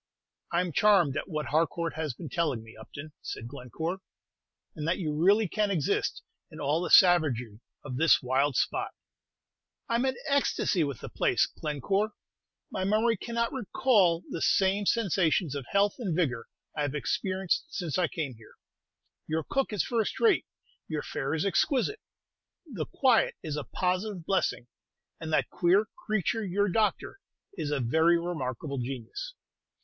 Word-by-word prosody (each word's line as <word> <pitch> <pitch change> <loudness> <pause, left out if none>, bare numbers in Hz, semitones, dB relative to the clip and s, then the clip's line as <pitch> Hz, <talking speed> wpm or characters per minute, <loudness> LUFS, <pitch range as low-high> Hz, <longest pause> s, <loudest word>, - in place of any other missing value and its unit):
"I'm 175 0 +1
charmed 180 -6 +4
at - - -3
what 155 -3 -2
Harcourt 165 +2 0
has 155 -5 -3
been 170 - -8
telling 150 -10 -1
me, 115 0 -14
Upton," 140 +7 -10
said 115 - -6
Glencore; 145 +8 -5 0.8
"and 155 0 -4
that 170 - +1
you 155 -6 -2
really 195 +7 +4
can 210 +4 0
exist 170 -8 0 0.3
in - - -11
all 150 +3 +1
the 175 - -2
savagery 135 - +5 0.3
of 130 -3 -5
this 160 +2 +5
wild 135 +2 +1
spot." - - -1 0.9
"I'm 235 +2 +1
in 260 -1 0
ecstasy 280 - +2
with 140 -5 -4
the - - -7
place, - - +2
Glencore. 195 +9 -2 0.6
My 190 - -2
memory 215 +4 +2
cannot 235 +2 -2
recall 200 -8 +2
the 165 - -5
same 195 +1 +2
sensations 185 - +2
of 140 -4 -5
health 200 0 +2
and 195 -9 -2
vigor 155 -8 -1 0.3
I 150 - -2
have 145 0 -1
experienced 185 - -1
since 175 - -3
I 175 - +3
came 155 -7 -4
here. 110 - -17 0.7
Your 160 0 -1
cook 270 - -1
is 210 -4 0
first 230 -3 -1
rate; 440 -4 +3 0.4
your 155 -2 -3
fare 135 +4 -2
is 160 - -1
exquisite; 260 - +1 0.7
the 210 - -5
quiet 255 -4 +3
is 155 -2 -3
a 150 - -4
positive 185 0 -2
blessing; 190 -10 0 0.5
and 160 -1 -5
that - - +1
queer 185 +5 +3 0.2
creature, 215 +1 0
your 200 +1 +1
doctor, 215 - 0 0.3
is 160 -7 -4
a 145 -1 0
very 160 +8 +3
remarkable 140 -5 -4
genius." 135 - -6
170 Hz, 155 wpm, -29 LUFS, 150-205 Hz, 0.9 s, savagery